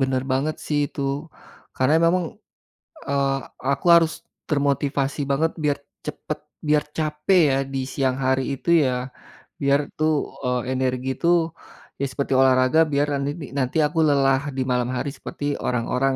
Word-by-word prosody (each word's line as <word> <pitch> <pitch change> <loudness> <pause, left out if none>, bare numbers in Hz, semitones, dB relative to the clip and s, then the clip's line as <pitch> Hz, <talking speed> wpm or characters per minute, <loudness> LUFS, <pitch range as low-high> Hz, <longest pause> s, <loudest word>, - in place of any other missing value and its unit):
bener 130 -1 +1
banget 145 +4 0
sih 150 - 0
itu, - - -8 0.8
karena 130 +4 +3
memang, 180 +1 +2 0.9
eee, 140 -1 +1 0.4
aku 140 +5 -2
harus 165 -1 +4 0.4
termotivasi 140 -1 0
banget 160 +4 +2
biar 145 -1 +2 0.3
cepet - - -5 0.3
biar 150 0 +3
capek 155 +4 +2
ya - - +2 0.2
di 135 - -1
siang 130 -2 0
hari 130 0 +2
itu 135 - -5 0.2
ya 130 - +1 0.7
biar 140 0 +3 0.2
tuh, 155 0 +2 0.3
eee, 125 -1 +1
energi 130 0 -1
itu 170 - -2 0.7
ya 140 - 0
seperti 140 +1 -2
olahraga 130 +3 +4
biar 145 +1 +2
nanini 145 +3 -3
nanti 130 +3 -1
aku 160 +2 -3
lelah 135 -1 +3 0.2
di 130 - +1
malam 125 -1 +1
hari 140 +3 -2
seperti 145 - -7 0.2
orang-orang, 125 +2 0
140 Hz, 145 wpm, -23 LUFS, 130-150 Hz, 0.9 s, harus